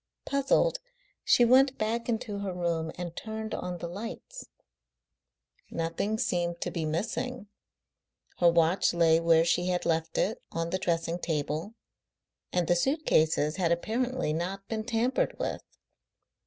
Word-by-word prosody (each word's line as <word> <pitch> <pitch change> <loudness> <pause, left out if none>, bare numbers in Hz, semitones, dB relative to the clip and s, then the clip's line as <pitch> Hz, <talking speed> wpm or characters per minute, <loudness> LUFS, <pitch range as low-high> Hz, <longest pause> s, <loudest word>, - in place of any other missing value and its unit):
Puzzled, 280 - +2 0.4
she 240 - +5
went 260 +2 +5
back 230 +2 -1
into 225 -3 -2
her 200 -1 -3
room 170 -2 -1
and 175 -1 -6
turned 220 0 -5
on 180 -1 -4
the 170 - -5
lights. 230 - -7 1.2
Nothing 170 +6 -2
seemed 175 -7 -1
to - - -2
be 165 -4 -2
missing: 220 +8 -3 0.9
her 175 - +6
watch 170 +2 +3
lay 165 -1 +5
where 165 -1 +4
she 175 +1 +1
had 180 -1 0
left 165 0 0
it 220 - 0
on 165 0 -2
the 185 - 0
dressing 165 0 -1
table; 160 +5 -2 0.8
and 180 -2 0
the 175 - +4
suit 275 - 0
cases 155 0 +2
had 175 -3 +1
apparently 235 +2 0
not 190 +4 -4
been 220 -1 -3
tampered 240 +3 0
with. - - -3
180 Hz, 140 wpm, -29 LUFS, 165-225 Hz, 1.2 s, her